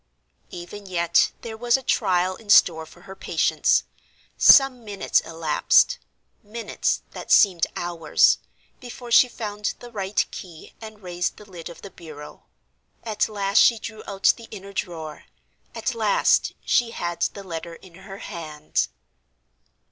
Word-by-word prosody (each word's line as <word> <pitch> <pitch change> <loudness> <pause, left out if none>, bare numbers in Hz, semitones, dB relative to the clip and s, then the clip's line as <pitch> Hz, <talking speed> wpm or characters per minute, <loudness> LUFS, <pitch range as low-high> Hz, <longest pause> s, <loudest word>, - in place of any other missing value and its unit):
Even 180 +3 -9
yet 170 -2 +2
there 225 -1 -7
was 240 +2 +2
a 265 - -10
trial 185 -5 +1
in 215 +1 -17
store 160 -5 +5
for 175 - -18
her 190 +2 -11
patience. - - +1 0.5
Some 270 -3 +6
minutes 205 -3 0
elapsed—minutes 205 - -1
that - - -8
seemed 180 -5 +5
hours—before 175 - -1
she 250 +2 +6
found 210 -3 -4
the 240 -1 -12
right 200 -2 -1
key 170 -4 -11
and 215 -2 -11
raised 180 -1 -3
the 210 - -13
lid 175 -4 -10
of 170 - -13
the 200 - -9
bureau. 155 -4 -12 0.6
At 220 -1 -1
last 200 -1 +1
she 230 - +5
drew 220 0 -8
out 195 -1 +3
the 230 -1 -12
inner 200 -2 -10
drawer! 160 -5 -6 0.5
At 260 - -2
last 220 -3 +2
she 240 -1 +2
had 175 -6 -5
the 200 - -2
letter 170 -2 -7
in 180 +1 -17
her 190 +2 -11
hand! 155 -5 -4
195 Hz, 140 wpm, -23 LUFS, 175-220 Hz, 0.6 s, Some